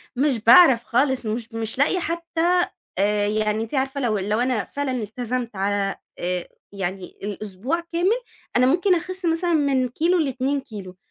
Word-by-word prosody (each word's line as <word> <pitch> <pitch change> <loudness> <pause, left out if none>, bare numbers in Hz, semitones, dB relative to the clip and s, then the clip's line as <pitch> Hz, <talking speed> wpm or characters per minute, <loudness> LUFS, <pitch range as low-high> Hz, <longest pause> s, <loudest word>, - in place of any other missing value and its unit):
مش 265 -1 +1
باعرَف 245 -1 +7
خالص، 260 +1 +1
مش، 225 +1 -4
مش 225 0 -4
لاقية 300 +7 +2
حتى 340 +1 +1 0.7
يعني 215 0 0
أنتِ 225 - -9
عارفة 270 0 -1
لو 225 -4 +1
لو 210 +3 0
أنا 245 -3 +1
فعلًا 285 -2 -3
التزمت 240 0 -3
على 195 0 0 0.2
آآ 180 0 -2 0.2
يعني 190 -1 -4 0.2
الأسبوع 210 - -3
كامل، 345 +7 0 0.3
أنا 250 - +5
ممكن 360 +7 +3
أخس 370 +2 -4
مثلًا 335 +1 +1
من 275 -4 +2
كيلو 340 +8 +1
ل2 275 -1 0
كيلو، 200 -8 -10
255 Hz, 150 wpm, -23 LUFS, 215-325 Hz, 0.7 s, باعرَف